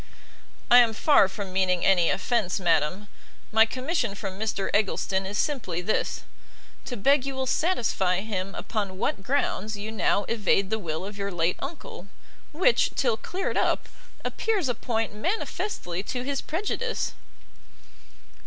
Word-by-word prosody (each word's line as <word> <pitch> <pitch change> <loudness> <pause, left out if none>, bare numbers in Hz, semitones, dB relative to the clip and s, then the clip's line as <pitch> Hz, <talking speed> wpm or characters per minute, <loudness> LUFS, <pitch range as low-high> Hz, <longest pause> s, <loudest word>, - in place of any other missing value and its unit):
"I 245 - +10
am 230 -2 +4
far 285 -5 +5
from 195 -1 -6
meaning 185 -2 +2
any 180 -3 +4
offence, 215 -3 0
madam; 175 +3 +1 0.4
my 225 +1 +6
commission 255 - -1
from 195 -2 -6
Mr 210 -3 -1
Eggleston 195 -2 +1
is 205 +2 -3
simply 255 - -1
this, 180 +4 -1 0.6
to 250 - -5
beg 275 +6 +4
you 275 0 -4
will 265 0 -1
satisfy 225 - +1
him 195 -3 -4
upon 200 -4 -3
what 195 - -1
grounds 220 -3 -1
you 210 +2 -5
now 205 -1 +1
evade 205 -3 +1
the 220 - +1
will 165 -2 -4
of 205 0 -8
your 200 0 -2
late 175 0 0
uncle, 275 - -8 0.4
which, 375 +10 +3
till 240 -5 +2
cleared 365 - -3
up, - - +1 0.4
appears 420 -9 0
a 245 - +1
point 225 -2 -2
manifestly 215 - -3
to 245 +5 -4
his 275 +1 -2
prejudice." 425 +8 -2
215 Hz, 145 wpm, -26 LUFS, 190-265 Hz, 0.6 s, I